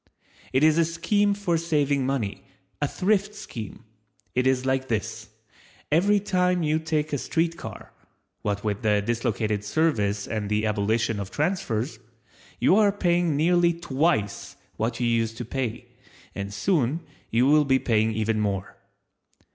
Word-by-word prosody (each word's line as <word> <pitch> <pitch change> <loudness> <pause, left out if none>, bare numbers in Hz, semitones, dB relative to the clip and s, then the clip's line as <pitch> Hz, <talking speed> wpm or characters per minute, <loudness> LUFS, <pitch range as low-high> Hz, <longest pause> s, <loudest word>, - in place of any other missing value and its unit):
It 130 +3 +2
is 155 +1 +5
a - - +5
scheme 200 +5 +1
for 175 -5 0
saving 145 -5 +1
money, 105 -8 -2 0.4
a 145 - +2
Thrift 200 +5 0
scheme. 110 - -8 0.5
It 125 +1 +2
is 130 -1 +1
like 130 0 0
this—Every 110 - -2
time 180 -3 +1
you 155 +1 +1
take 155 -1 -1
a 145 - 0
street 165 +6 0
car - - -9 0.5
(what 100 -1 -2
with 105 -2 -2
the 105 -2 +2
dislocated 110 -2 -1
service 105 -6 0
and 105 -2 -3
the 105 +1 +1
abolition 110 +1 0
of 100 -1 -5
transfers) 130 - -1 0.6
you 190 - +4
are 210 -2 +5
paying 175 -5 +1
nearly 170 +2 +3
twice 135 - -1 0.2
what 115 +1 -2
you 120 - 0
used 115 -1 0
to 120 - -5
pay, 120 -1 -4 0.4
and 100 0 -5
soon 150 - 0 0.3
you 120 +3 +3
will 150 +2 +5
be 135 -2 +3
paying 110 -3 +1
even 110 0 0
more. 100 -3 -2
130 Hz, 145 wpm, -25 LUFS, 110-165 Hz, 0.6 s, is